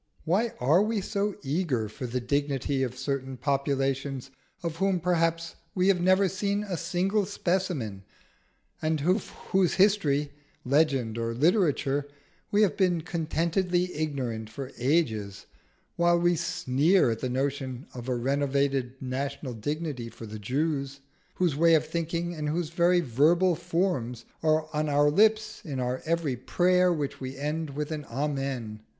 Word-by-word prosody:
Why 205 +8 +1
are 150 +9 +4
we 215 +1 0
so 200 +1 -1
eager 140 -6 0
for 125 +4 -6
the 125 +2 -2
dignity 140 +1 -1
of 130 -1 -2
certain 135 0 -3
populations 135 -1 -1 0.3
of 165 -1 -3
whom 190 0 +1
perhaps 165 -1 0 0.2
we 185 +1 +3
have 185 -3 +3
never 185 +2 +4
seen 200 +2 -1
a 195 -3 -3
single 190 +5 0
specimen, 170 - -1 0.8
and 155 -1 0
of 185 +7 +1 0.2
whose 190 -2 +3
history, 155 -8 +3 0.3
legend, 135 -5 +2
or 115 0 -2
literature 145 - +2 0.4
we 210 +1 +4
have 205 - +2
been 180 -4 +2
contentedly 175 +2 0
ignorant 130 -8 -3
for 135 +3 -7
ages, 110 -8 0 0.5
while 170 0 +4
we 175 0 +3
sneer 160 -1 +2
at 115 - -3
the 130 - -2
notion 135 0 -2
of 125 0 -7
a 125 - +1
renovated 135 0 0
national 135 +1 -4
dignity 140 +1 -4
for 115 - -10
the 110 0 -7
Jews, 140 +4 -2 0.3
whose 175 -6 +1
ways 165 +1 +5
of 155 - -2
thinking 170 +2 -2
and 150 -2 -3
whose 165 0 -2
very 175 +1 +3
verbal 165 +7 +3
forms 165 -9 -1 0.2
are 155 0 +2
on 150 0 0
our 145 0 +4
lips 215 +5 +3
in 140 -5 -4
every 135 +4 -1
prayer 180 +7 +3
which 150 -6 -3
we 130 +1 -5
end 150 +2 -2
with 150 +1 -3
an 150 -2 -4
Amen? 135 -5 -3
150 Hz, 145 wpm, -28 LUFS, 130-175 Hz, 0.8 s, ways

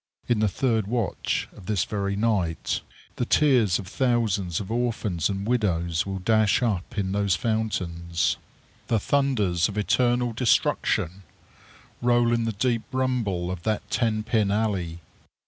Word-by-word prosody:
In 120 -3 +2
the 110 - +3
third 110 -1 0
watch 115 -2 -1
of 90 - -13
this 105 -5 +1
very 100 -1 -2
night, 100 -6 0 0.4
the 125 - 0
tears 125 -11 +4
of 95 - -7
thousands 105 - 0
of 105 +1 -6
orphans 110 -8 0
and 100 0 -3
widows 90 -7 0
will 95 0 -3
dash 110 +4 +2
up 105 -4 -2
in 95 -2 0
those 100 -2 +1
fountains. 85 -6 -1 0.5
The 115 - +2
thunders 105 -9 +1
of 105 - -7
eternal 120 +2 +2
destruction 100 -6 +1 0.8
roll 120 -1 +3
in 115 -1 +1
the 115 - 0
deep 115 +2 0
rumble 115 -9 -1
of 90 -2 -5
that 110 +2 -2
ten 110 -3 +1
pin 110 -2 +1
alley. 100 -6 -1
105 Hz, 145 wpm, -25 LUFS, 95-120 Hz, 0.8 s, tears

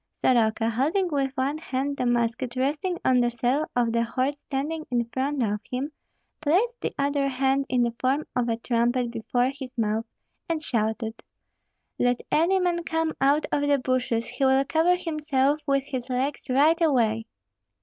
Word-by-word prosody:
Soroka, 225 -2 +3
holding 315 - +1
with 275 -2 0
one 275 +4 0
hand 280 -2 -2
the 250 - 0
musket 240 +1 0
resting 295 +7 -1
on 255 -1 +4
the 240 -1 +3
saddle 250 +6 0
of 240 -2 +2
the 230 0 +1
horse 255 +4 -1
standing 295 +4 -3
in 240 -1 +1
front 270 0 0
of 210 -1 -1
him, 265 +4 -3 0.5
placed 400 +11 +1
the - - -2
other 280 0 +1
hand 270 +1 +1
in 250 -1 +2
the 235 -1 0
form 270 +4 +1
of 240 -1 +1
a 225 - 0
trumpet 240 +1 0
before 245 +2 0
his 265 -3 -9
mouth, 220 0 0 0.4
and 330 -1 0
shouted, 225 -4 -2 0.8
"Let 245 0 +2
any 345 +5 +3
man 350 -2 0
come 325 -1 -1
out 285 +3 +3
of 290 - +1
the 285 -1 +4
bushes, 250 -3 0
he 275 - -4
will 265 +1 +4
cover 330 +5 +3
himself 300 -4 0
with 275 -1 +2
his 260 -3 -5
legs 265 +2 -2
right 300 +6 +4
away." 230 -8 +2
265 Hz, 170 wpm, -26 LUFS, 240-295 Hz, 0.8 s, on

